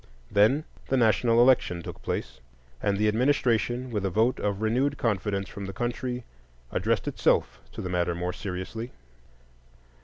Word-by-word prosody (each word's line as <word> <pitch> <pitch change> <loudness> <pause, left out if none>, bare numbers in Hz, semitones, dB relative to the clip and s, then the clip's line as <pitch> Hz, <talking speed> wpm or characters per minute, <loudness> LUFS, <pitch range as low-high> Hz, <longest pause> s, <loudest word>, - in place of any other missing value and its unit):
Then 110 +9 +4 0.2
the 135 - +1
national 115 0 +4
election 120 -9 +4
took - - -8
place; - - -4 0.4
and 100 -1 +1
the 105 +1 +2
administration, 120 0 +1
with 105 -3 -1
a 95 - +1
vote 110 +7 +2
of 100 -1 -1
renewed 130 +6 +1
confidence 100 -4 -1
from 100 - -7
the 95 - -6
country, 125 +1 -2 0.5
addressed - - 0
itself - - +1
to - - -6
the - - -3
matter 90 -1 0
more 90 +1 -2
seriously. 100 +5 -5
110 Hz, 150 wpm, -27 LUFS, 95-125 Hz, 0.5 s, Then